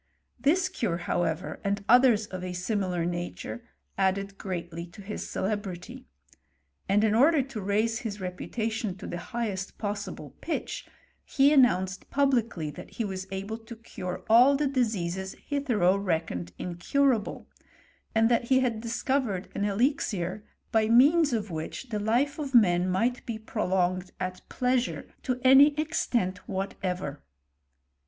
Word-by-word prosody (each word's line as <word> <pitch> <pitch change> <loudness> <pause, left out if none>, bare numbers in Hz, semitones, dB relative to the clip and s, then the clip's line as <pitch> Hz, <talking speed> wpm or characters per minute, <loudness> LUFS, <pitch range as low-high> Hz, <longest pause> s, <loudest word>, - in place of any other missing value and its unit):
This 350 +7 +3
cure, 230 - -2
however, 175 -1 -2
and 200 0 -1
others 245 -3 +6
of 185 -3 -7
a 180 -1 -4
similar 180 -2 -1
nature, 175 +6 -4 0.4
added 195 +1 +1
greatly 170 -3 -5
to 175 - -16
his 210 +2 -5
celebrity; 205 +5 -4 0.8
and 205 +2 +4
in 215 -1 +3
order 280 +5 +5
to 255 -5 -7
raise 215 +3 +1
his 220 -5 -5
reputation 215 +3 -3
to - - -9
the 175 - -4
highest 200 -1 -4
possible 200 - -5
pitch, 330 - -4 0.5
ho, 275 +1 +6
announced 190 -9 +3
publicly 235 - +1
that - - -11
he 230 - -2
was 190 -1 -5
able 195 +4 -4
to 230 +1 -10
cure 185 -5 -6
all 245 +5 +7
the 295 +2 +1
diseases 190 -8 -1
hitherto 225 -10 +2
reckoned 160 - -2
incurable; 220 +7 0 0.7
and 225 0 +5
that 235 0 +2
he 260 +1 +4
had 235 -4 0
discovered 230 -4 -1
an 200 - -1
elixir, 205 - 0 0.3
by 220 -2 +3
means 290 +6 +6
of 215 -5 -2
which 160 +10 -5
the 215 -2 -2
life 250 +8 +1
of 275 -3 -3
man 180 -5 +5
might 235 +7 0
be 230 -2 -3
prolonged 185 -4 -1
at 185 0 -4
pleasure 250 0 0
to 255 -2 -2
any 280 +3 +7
extent 235 - 0
whatever. 185 -6 -3
210 Hz, 140 wpm, -28 LUFS, 185-245 Hz, 0.8 s, all